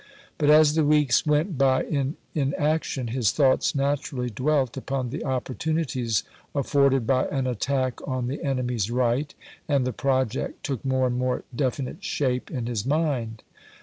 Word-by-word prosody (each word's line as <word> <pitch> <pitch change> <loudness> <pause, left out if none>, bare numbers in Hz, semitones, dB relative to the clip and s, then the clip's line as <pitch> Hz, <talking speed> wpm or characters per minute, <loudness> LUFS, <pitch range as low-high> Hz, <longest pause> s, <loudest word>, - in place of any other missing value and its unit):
But 145 - +3
as 150 0 +6
the 160 0 +2
weeks 150 -2 +3
went 150 +1 +1
by 130 -1 +3
in 140 -1 -2 0.2
inaction, 145 -3 0
his 120 -3 +1
thoughts 135 +2 +3
natui'ally 135 -3 -1
dwelt 135 +1 +1
upon 135 -2 -3
the 150 - -4
opportunities 130 -3 -1 0.3
afforded 140 -2 +2
by 130 +2 +2
an 135 -2 -1
attack 130 +1 -1
on 130 -2 -1
the 130 +4 -4
enemy's 125 -6 -1
right, 125 +4 0 0.4
and 140 -4 +2
the 130 - -2
project 130 -1 -1
took 135 -5 -3
more 130 -1 +1
and 125 0 -1
more 125 0 -1
definite 130 0 -2
shape 130 -3 -1
in 125 -5 -3
his 115 -4 -2
mind. 135 -6 -1
130 Hz, 150 wpm, -25 LUFS, 125-145 Hz, 0.4 s, as